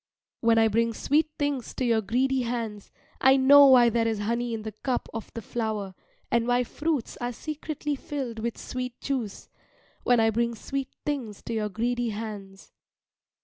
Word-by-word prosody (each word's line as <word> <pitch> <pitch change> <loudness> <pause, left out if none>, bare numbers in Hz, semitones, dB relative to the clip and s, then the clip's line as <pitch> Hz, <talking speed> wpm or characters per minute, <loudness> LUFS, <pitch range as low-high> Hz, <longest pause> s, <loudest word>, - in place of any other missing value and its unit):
When 230 -1 +3
I 225 0 +5
bring 230 +1 +1
sweet 305 +2 +2
things 285 -5 -2
to 255 - -1
your 230 -2 +3
greedy 260 +5 +1
hands, 230 -4 -4 0.3
I 265 +1 +6
know 280 +2 +8
why 250 -3 +7
there 230 0 +1
is 225 -1 0
honey 235 +3 -1
in 225 -1 -4
the 220 - -5
cup 245 +4 -3
of 225 - -6
the 230 - -5
flower, 215 -4 -3 0.4
and 235 -1 +2
why 245 0 +3
fruits 295 0 -2
are 245 0 -3
secretly 295 +2 -4
filled 265 -5 -5
with 235 +1 -3
sweet 250 -1 -5
juice 250 -8 -3 0.5
when 245 -1 +3
I 225 0 +4
bring 235 +1 0
sweet 270 +4 -4 0.2
things 255 -9 -3
to 230 - -5
your 215 -1 -1
greedy 240 +3 -1
hands. 205 -3 -7
235 Hz, 175 wpm, -27 LUFS, 225-265 Hz, 0.5 s, know